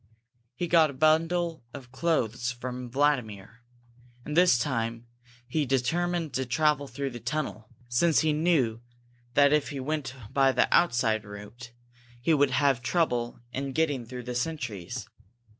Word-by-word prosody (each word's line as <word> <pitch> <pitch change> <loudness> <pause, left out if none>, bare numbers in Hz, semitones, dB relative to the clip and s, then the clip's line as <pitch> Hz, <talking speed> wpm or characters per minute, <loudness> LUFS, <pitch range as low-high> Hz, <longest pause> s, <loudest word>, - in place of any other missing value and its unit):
He 175 - -2
got 165 -2 +5
a - - -7
bundle 165 +3 +1
of 130 -3 -10
clothes 125 -5 0
from 125 0 -6
Vladimir, 120 -6 -1 0.6
and 150 - -4
this 175 -6 +5
time 115 -2 -2 0.4
he 150 +4 0
determined 160 +5 0
to 130 +1 -1
travel 145 +2 +1
through 135 +1 -4
the 120 - -7
tunnel, 130 -3 -4 0.2
since 150 +7 +3
he 155 -1 +2
knew 150 -8 +1 0.5
that 140 0 +5
if 150 -1 +1
he 140 - -5
went 135 -1 -3 0.2
by 135 -1 +4
the - - +3
outside 120 -9 +2
route 105 +4 -10 0.5
he 160 +7 +2
would 145 -2 +4
have 135 -1 +2
trouble 125 -5 0
in 135 +1 -3
getting 145 -4 0
through 125 +1 -8
the 125 +1 -5
sentries. 125 - -4
135 Hz, 145 wpm, -28 LUFS, 120-155 Hz, 0.6 s, got